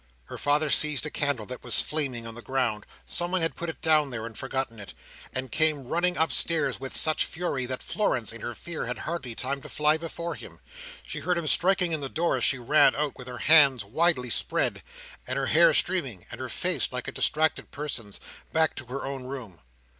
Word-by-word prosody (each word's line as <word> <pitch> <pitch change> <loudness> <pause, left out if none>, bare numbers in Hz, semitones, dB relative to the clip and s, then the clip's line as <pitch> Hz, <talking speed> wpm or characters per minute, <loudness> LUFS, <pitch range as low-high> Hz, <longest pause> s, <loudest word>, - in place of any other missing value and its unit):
Her - - -9
father 145 +1 +1
seized 150 -1 +3
a 155 - -4
candle 145 -7 -1
that 125 +2 -8
was - - +3
flaming 135 -7 -2
on 115 - -7
the 120 - -10
ground—someone 135 - -2
had 165 - -1
put 170 - -4
it 165 - -7
down 155 -3 +3
there, 115 -3 -5
and 115 -1 -8
forgotten 130 -4 -4
it—and 130 +5 -8
came 155 -3 +3
running 175 +6 0
upstairs 160 -2 +1
with 135 0 -2
such 155 -1 +4
fury, 160 -7 -3
that 130 0 -5
Florence, 120 - -1
in 115 - -10
her 120 - -5
fear, 165 -2 -5
had 125 - -3
hardly 150 -8 -5
time 140 +3 -3
to - - -11
fly 150 +1 +2
before 170 +1 -5
him. - - -12 0.5
She - - -4
heard 180 -1 0
him 170 - -2
striking 180 +1 +4
in 155 -2 -2
the 135 - -3
door, 170 +4 0
as - - -2
she 135 - +3
ran 135 +3 +4
on, 145 -1 -1
with 125 - -11
her 125 -1 -6
hands 140 -5 +5
widely 125 +1 +1
spread, - - -1 0.5
and - - -2
her - - 0
hair - - +5
streaming, 135 - 0
and - - -7
her - - -5
face - - +1
like - - -5
a - - -3
distracted 155 +1 +1
person's, 130 -9 -5 0.3
back 160 -1 +2
to 130 - -5
her 135 +2 -5
own 135 -2 -5
room. 125 -10 -8
140 Hz, 205 wpm, -27 LUFS, 125-160 Hz, 0.5 s, hands